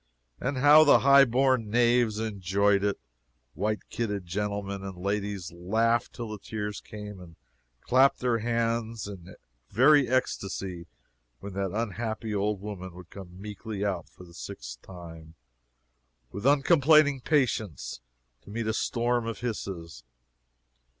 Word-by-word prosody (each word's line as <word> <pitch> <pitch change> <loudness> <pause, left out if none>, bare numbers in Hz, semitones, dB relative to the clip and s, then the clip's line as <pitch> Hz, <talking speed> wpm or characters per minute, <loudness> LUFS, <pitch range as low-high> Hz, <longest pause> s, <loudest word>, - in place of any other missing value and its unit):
And 135 +1 -2
how 145 +3 +8
the 145 - +6
high 140 +1 +7
born 130 -2 +2
knaves 120 -1 +3
enjoyed 100 -2 +1
it! 100 -1 0 0.5
White 105 +5 -2
kidded 105 -5 -3
gentlemen 100 +1 -3
and 95 -2 -7
ladies 100 -1 -3
laughed 110 +7 0
till 115 -2 -6
the 105 - -6
tears 105 -1 -5
came, 105 -2 -9
and 85 -2 -13 0.5
clapped 130 +2 +4
their 120 -2 +1
hands 115 -1 -1
in 95 -2 -10 0.3
very 135 +5 +5
ecstacy 95 -7 -2 0.5
when 100 -1 -8
that 95 0 -2
unhappy 110 +1 -3
old 100 -1 -1
woman 95 -4 -7
would 90 -1 -13
come 90 -2 -11
meekly 105 0 -5
out 95 -5 -3
for - - -15
the 85 -1 -15
sixth - - -8
time, 80 -3 -11 1.0
with 100 +6 -2
uncomplaining 145 -1 +5
patience, 115 - -1 0.4
to - - -16
meet 115 +2 -3
a 110 - 0
storm 120 +1 0
of 115 - -5
hisses! 85 - -5
105 Hz, 135 wpm, -28 LUFS, 95-120 Hz, 1.0 s, how